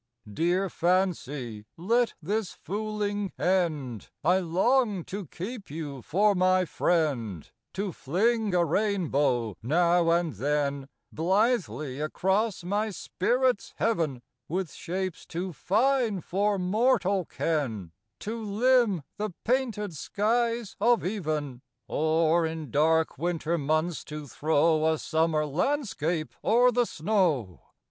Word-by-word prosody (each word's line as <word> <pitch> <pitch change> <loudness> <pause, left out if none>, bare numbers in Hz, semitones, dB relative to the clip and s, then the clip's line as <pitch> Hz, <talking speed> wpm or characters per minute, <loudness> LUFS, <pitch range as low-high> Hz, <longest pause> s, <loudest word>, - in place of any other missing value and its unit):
55 105 - -13
Dear 175 - +1
Fancy, 150 - -1
let 230 +7 +1
this 205 +2 -1
fooling 205 -1 -3
end! 155 - 0
I 180 +4 +4
long 195 +3 +1
to 195 0 -6
keep 200 - -7
you 145 -3 -6
for 205 - +2
my 185 0 +3
friend, 135 - 0 0.3
To 195 +1 -2
fling 205 - 0
a 175 -1 +4
rainbow, 145 - 0
now 170 +6 +3
and 170 -2 +2
then, 140 +3 -1 0.2
Blithely 180 - 0
across 190 +6 0
my 205 +4 0
spirit's 245 +4 0
heaven; 160 - 0 0.3
With 180 -1 -2
shapes 185 0 -4
too 180 +2 -4
fine 225 - +1
for 200 +5 0
mortal 195 -1 +2
ken 115 - -2 0.3
To 225 +2 -4
limn 220 - +2
the 215 +1 -2 0.2
painted 230 -6 0
skies 230 - 0
of 235 -1 +3
even; 155 - -3 0.3
Or 160 +2 +2
in 160 -2 -4
dark 160 +2 +2
winter 170 -1 -1
months 155 +3 0
to 150 -1 -7
throw 155 +2 +2
A 160 - 0
summer 160 0 +1
landscape 165 - -1
o'er 245 +3 +5
the 245 0 +2
snow. 155 - 0
175 Hz, 115 wpm, -27 LUFS, 155-210 Hz, 0.3 s, o'er